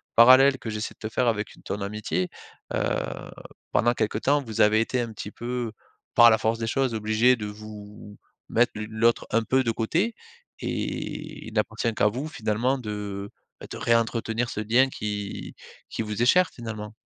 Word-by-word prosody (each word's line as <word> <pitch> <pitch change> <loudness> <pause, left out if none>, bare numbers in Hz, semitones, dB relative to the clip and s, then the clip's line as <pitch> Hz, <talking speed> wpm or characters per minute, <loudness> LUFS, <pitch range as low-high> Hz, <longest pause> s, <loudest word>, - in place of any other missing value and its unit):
parallèle 130 +3 +8
que 115 - -6
j'essaie 105 +1 -4
de 110 - -4
te 110 - -11
faire 125 - +2
avec 105 -2 -1
une - - -19
ton 100 - -4
amitié. 100 -3 -2 0.4
Heu, - - +1 0.9
pendant 120 +1 +3
quelques 105 -1 -1
temps 145 +1 +3
vous 110 -3 -2
avez 110 +1 +5
été 125 +2 -1
un 115 -2 -4
petit 105 - -6
peu, 120 -1 -4 0.4
par 120 0 +9
la 110 - +4
force 110 +1 +1
des 115 - -2
choses, 130 -2 0
obligées 110 +4 +3
de 105 - -5
vous 105 0 -10 0.3
mettre 120 +2 +3
l'une 105 +1 -6
l'autre 115 +2 +2
un 115 0 +2
peu 130 +4 +2
de 120 - -1
côté 170 - 0 0.4
et - - -4
il - - -9
n'appartient 115 -2 0
qu'à 105 - +3
vous, 125 +8 -2
finalement, 120 -1 0
de, 105 -3 -5 0.3
bah, - - -9
de - - -5
réentretenir 115 0 +1
ce 105 - -3
lien 120 +5 +4
qui 105 -4 -5 0.3
qui - - -3
vous 105 +1 -4
est - - +4
cher, 180 +4 +5
finalement. 110 -2 -7
115 Hz, 185 wpm, -26 LUFS, 105-120 Hz, 0.9 s, par